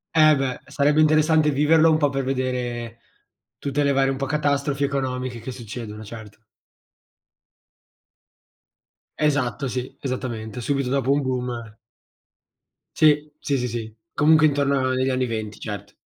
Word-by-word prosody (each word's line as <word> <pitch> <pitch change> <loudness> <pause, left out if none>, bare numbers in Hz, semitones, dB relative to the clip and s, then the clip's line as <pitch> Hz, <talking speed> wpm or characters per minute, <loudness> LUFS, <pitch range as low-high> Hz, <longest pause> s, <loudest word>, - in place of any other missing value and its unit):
Eh 155 -1 +6
beh, 135 -2 -2
sarebbe 145 +2 +2
interessante 155 0 +4
viverlo 155 +3 +4
un 155 - +4
po' 145 -2 +2
per 135 -1 -2
vedere 125 -3 -3 0.6
tutte 145 +1 -1
le 140 - +2
varie 135 0 +2
un 135 - -2
po' 135 - -2
catastrofi 145 0 0
economiche 130 -3 -2
che 115 +3 -7
succedono, 115 -3 -8
certo. 110 -1 -11 2.8
Esatto, 140 -4 0
sì, 125 0 -4
esattamente, 125 -4 -4
subito 140 +1 -1
dopo 135 0 +1
un 145 +1 +2
boom. 125 -4 -3 1.2
Sì, 150 -1 +3
sì, 140 - -1
sì, 125 -1 -1
sì, 110 -2 -6 0.2
comunque 155 +1 +5
intorno 140 -2 +1
agli 130 +1 +1
anni 130 0 0
'20 110 -3 -5
cert 100 -1 -7
135 Hz, 135 wpm, -23 LUFS, 120-145 Hz, 2.8 s, Eh